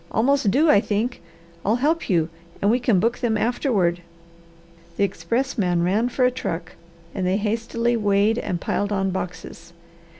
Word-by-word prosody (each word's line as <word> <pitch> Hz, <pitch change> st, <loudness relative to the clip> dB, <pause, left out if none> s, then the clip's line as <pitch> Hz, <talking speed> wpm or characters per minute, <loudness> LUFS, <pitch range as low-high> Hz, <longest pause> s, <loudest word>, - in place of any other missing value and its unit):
Almost 260 Hz, -1 st, +2 dB
due 285 Hz, +11 st, +3 dB
I 295 Hz, -, +6 dB
think. 220 Hz, +2 st, -2 dB, 0.4 s
I'll 215 Hz, +4 st, +2 dB
help 305 Hz, +7 st, 0 dB
you 165 Hz, -3 st, +2 dB, 0.3 s
and 200 Hz, -, +2 dB
we 245 Hz, -, +2 dB
can 235 Hz, -6 st, +2 dB
book 230 Hz, +5 st, 0 dB
them 225 Hz, -3 st, 0 dB
afterward." 210 Hz, -, 0 dB, 1.0 s
The -, -, +2 dB
expressman 195 Hz, -1 st, 0 dB
ran 210 Hz, +7 st, +1 dB
for 255 Hz, 0 st, +1 dB
a 250 Hz, -, +3 dB
truck 170 Hz, -8 st, -4 dB, 0.4 s
and 190 Hz, -3 st, -2 dB
they 185 Hz, +2 st, +2 dB
hastily 230 Hz, +2 st, -1 dB
weighed 210 Hz, +1 st, +2 dB
and 180 Hz, -6 st, -3 dB
piled 205 Hz, +4 st, -2 dB
on 195 Hz, -1 st, 0 dB
boxes. 180 Hz, -2 st, -7 dB
210 Hz, 160 wpm, -23 LUFS, 190-240 Hz, 1.0 s, I